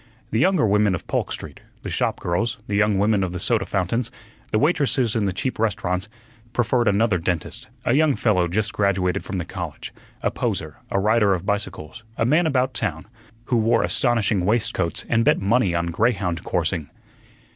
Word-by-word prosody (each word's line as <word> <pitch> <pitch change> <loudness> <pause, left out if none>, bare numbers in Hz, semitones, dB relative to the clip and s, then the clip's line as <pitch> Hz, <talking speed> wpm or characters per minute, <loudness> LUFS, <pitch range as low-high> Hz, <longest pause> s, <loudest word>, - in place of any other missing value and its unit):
The 110 - +1
younger 185 -1 +3
women 105 -2 +3
of 85 - -7
Polk - - -2
Street - - -6 0.2
the - - -5
shop - - -1
girls, 110 +8 -1
the 100 - -2
young 105 -1 +3
women 100 0 +2
of 90 -1 -3
the 90 - -4
soda 115 +5 0
fountains, 105 +5 -1 0.4
the - - +1
waitresses 130 - +1
in 110 -3 +1
the 95 - 0
cheap 95 +8 -3
restaurants 100 -2 -1 0.4
preferred 120 0 +1
another 100 -2 +2
dentist, 95 +9 -3 0.2
a 120 - +2
young 150 0 +3
fellow 90 -6 +2
just 100 +4 -1
graduated 100 -2 0
from 95 - -4
the 85 - -3
college, - - -7 0.3
a - - +1
poser, - - -3
a 100 - 0
rider 105 -1 +3
of 90 +1 -6
bicycles, 100 -2 -3
a 115 - +1
man 155 +7 +3
about 130 -3 +1
town, 95 -9 -3 0.4
who 125 - +1
wore 115 +1 +3
astonishing 115 -6 +2
waistcoats 95 -4 0
and 115 0 +2
bet - - +3
money 100 -2 +2
on 85 0 0
greyhound 90 -4 0
coursing. 85 -3 -1
105 Hz, 180 wpm, -23 LUFS, 90-115 Hz, 0.4 s, younger